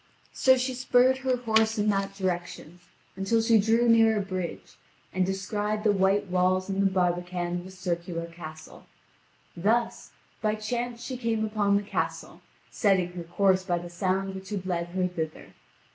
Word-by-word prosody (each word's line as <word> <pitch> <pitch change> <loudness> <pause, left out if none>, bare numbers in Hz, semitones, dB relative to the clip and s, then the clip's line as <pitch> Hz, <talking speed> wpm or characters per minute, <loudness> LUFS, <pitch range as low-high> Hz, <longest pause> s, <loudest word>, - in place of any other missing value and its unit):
So 260 0 +4
she 255 +1 -1
spurred 255 +1 +3
her 260 -1 0
horse 220 -1 +2
in 210 0 +1
that 195 -1 -1
direction, 175 -2 -4 0.4
until 195 +4 +1
she 225 0 +4
drew 225 +3 +3
near 225 -1 +5
a - - +1
bridge, 180 - -5 0.4
and 185 - +1
descried 205 +2 -2
the 215 - +4
white 195 +1 +2
walls 185 +1 +1
and 195 0 0
the 195 - +3
barbican 175 -1 -1
of 180 - -11
a - - -10
circular 175 -2 -4
castle. 160 -2 -11 0.7
Thus, 225 +7 0 0.3
by 215 -1 +1
chance 235 +2 -4
she 255 0 -5
came 225 -2 0
upon 210 -2 +1
the 205 - -2
castle, 205 - -4 0.3
setting 190 -4 +2
her 175 -1 -6
course 185 +2 +2
by 175 -2 0
the 175 0 -7
sound 190 +2 -1
which 190 0 -8
had 200 -3 -4
led 175 -2 -1
her 185 +1 -1
thither. 160 -3 -6
195 Hz, 170 wpm, -27 LUFS, 180-220 Hz, 0.7 s, near